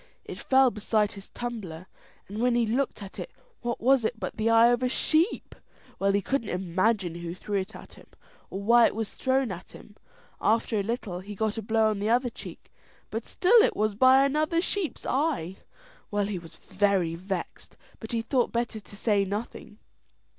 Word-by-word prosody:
It - - -8
fell 265 -1 +4
beside 210 0 0
his 200 -1 -11
tumbler, 200 -9 -6 0.4
and 205 +2 -6
when 245 0 +3
he 240 -1 +3
looked 240 -1 -1
at 195 - -10
it - - -5 0.3
what 235 -1 -3
was 260 +1 +4
it 225 +1 -2
but 185 - -4
the 220 +1 0
eye 230 +1 +6
of 245 0 +2
a 250 - +1
sheep. 320 - +1 0.5
Well, 195 0 +2
he 200 0 +1
couldn't 270 -3 -1
imagine 185 +1 0
who 170 0 -6
threw 200 +2 -2
it 190 +3 -6
at - - -12
him, - - -16 0.4
or 195 +1 -5
why 235 +2 +6
it - - -5
was 220 -1 -4
thrown 260 -3 0
at 175 -1 -9
him. 205 - -14 0.5
After 220 0 +2
a - - +2
little 200 -4 -3
he 205 +3 -8
got 220 +2 -1
a - - -4
blow 220 +1 +2
on 210 - -3
the 210 +2 -1
other 245 +1 +2
cheek, - - -11 0.4
and - - -3
still 445 +5 +5
it - - +2
was 215 0 +1
by 260 +5 +6
another 310 +4 +1
sheep's 365 -1 -3
eye. 255 - -1 0.5
Well, 205 -1 0
he 200 -3 -3
was 165 -1 -10
very 190 -3 0
vexed, 185 +1 -6 0.2
but 220 - -8
he 230 -1 -1
thought 250 0 +1
better 235 -2 -2
to 205 - -14
say 205 -1 +2
nothing. 210 +1 -6
220 Hz, 195 wpm, -27 LUFS, 200-245 Hz, 0.5 s, eye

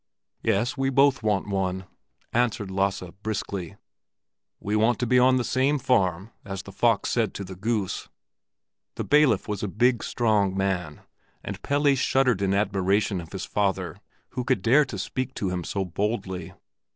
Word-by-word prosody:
"Yes, 115 +5 +1
we 135 -1 0
both 135 0 +4
want 105 -3 0
one," 95 -1 -2 0.5
answered 115 -5 0
Lasse, 95 0 0 0.2
briskly. 100 -5 -4 0.8
"We 105 +1 -2
want 110 +2 +3
to 125 - -1
be 125 +2 +4
at 130 +1 +5
the 125 - 0
same 135 +4 +1
farm—as 95 -5 -1
the 100 - -10
fox 115 +1 +1
said 115 -4 0
to 100 - -4
the 95 0 -8
goose." 105 0 -2 0.9
The - - -3
bailiff 145 -9 +3
was 105 -2 -3
a 105 - -1
big, 120 +5 +2
strong 105 -5 +1
man, 90 -6 -2 0.4
and - - -6
Pelle 145 0 +2
shuddered 130 -5 +2
in 100 0 +1
admiration 100 -1 +1
of 80 - -12
his 95 - -5
father 95 -5 -1 0.3
who 125 - -4
could 120 -6 0
dare 140 +6 +5
to 120 -7 -6
speak 130 +6 -3
to 95 - -1
him 90 -1 -2
so 95 +3 -2
boldly. 100 0 -3
105 Hz, 165 wpm, -25 LUFS, 95-125 Hz, 0.9 s, at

